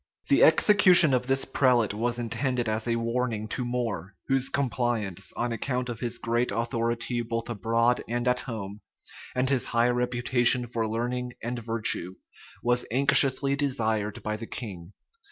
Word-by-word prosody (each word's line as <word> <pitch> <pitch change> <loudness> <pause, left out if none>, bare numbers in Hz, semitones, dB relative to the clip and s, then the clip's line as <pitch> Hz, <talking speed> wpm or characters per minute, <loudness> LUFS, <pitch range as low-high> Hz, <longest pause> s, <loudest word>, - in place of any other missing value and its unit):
The - - +5
execution 185 -8 +6
of 125 0 0
this 135 0 +1
prelate 125 -5 +2
was 120 +3 -2
intended 120 +1 -1
as 110 +1 -2
a 115 - +1
warning 115 -2 -2
to 125 - -3
More, 115 -7 -3
whose 135 0 +1
compliance, 120 -8 -2
on 120 0 -2
account 125 +2 -2
of 115 -2 -5
his 120 -1 -2
great 120 +1 -1
authority 115 +1 -2
both 115 0 -4
abroad 115 +3 +1
and 120 +1 -2
at 125 0 +2
home, 105 -4 -7 0.5
and 125 +1 +1
his 130 -2 +2
high 120 +1 +2
reputation 125 0 +2
for 115 -2 -3
learning 125 +2 -3
and 120 +1 -3
virtue, 110 -5 -1 0.5
was 120 0 +2
anxiously 140 +1 +3
desired 110 -7 -1
by 105 0 -2
the 115 +1 -8
king. 95 -5 -8
120 Hz, 155 wpm, -27 LUFS, 115-125 Hz, 0.5 s, execution